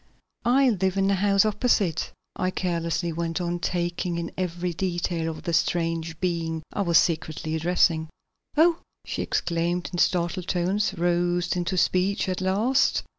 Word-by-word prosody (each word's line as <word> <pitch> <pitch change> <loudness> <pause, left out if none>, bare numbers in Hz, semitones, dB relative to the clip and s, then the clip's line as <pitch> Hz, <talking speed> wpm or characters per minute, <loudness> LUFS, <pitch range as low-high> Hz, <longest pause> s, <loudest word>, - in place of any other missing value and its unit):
"I 260 +2 +4
live 190 -2 0
in 195 - +2
the 200 - +3
house 195 +1 +3
opposite," 205 - +1 0.2
I 185 - 0
carelessly 170 -2 -1
went 165 +1 -2
on, 175 0 -2
taking 175 0 -2
in 170 0 -4
every 180 -1 -2
detail 175 -2 -1
of 160 - -7
the 170 - -2
strange 165 -1 0
being 165 -3 -2
I - - -1
was 170 -4 +4
secretly 155 -1 0
addressing. 160 -1 +2 0.5
"Oh!" 335 +2 +5 0.3
she - - -3
exclaimed 175 +1 -1
in 175 - -2
startled 175 +1 +1
tones, 195 +3 0
roused 175 +1 +1
into 180 +1 -1
speech 185 +3 +1
at 185 0 -2
last. 215 +9 +2
175 Hz, 150 wpm, -25 LUFS, 170-190 Hz, 0.5 s, Oh